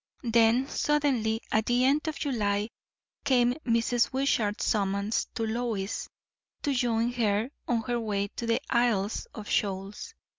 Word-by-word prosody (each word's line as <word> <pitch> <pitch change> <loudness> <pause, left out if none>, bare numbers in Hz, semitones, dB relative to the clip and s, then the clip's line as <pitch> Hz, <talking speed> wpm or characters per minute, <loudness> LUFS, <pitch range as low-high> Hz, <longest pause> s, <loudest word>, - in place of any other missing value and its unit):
Then 235 +2 +3
suddenly, 265 -8 +1
at 220 0 +1
the 245 +1 +3
end 290 +4 +2
of 315 - -2
July, 210 -5 -1 0.5
came 245 -3 +3
Mrs. 230 +1 +2
Wishart's 240 -5 0
summons 200 0 0
to 225 - -1
Lois 220 -3 -2 0.5
to 285 - +1
join 240 -2 +1
her 225 0 0 0.2
on 235 -2 +1
her 240 +1 -1
way 205 -3 -1
to 235 - -6
the 230 - +2
Isles 230 -4 +1
of 215 -2 -7
Shoals. 200 - -2
230 Hz, 140 wpm, -28 LUFS, 210-245 Hz, 0.5 s, Then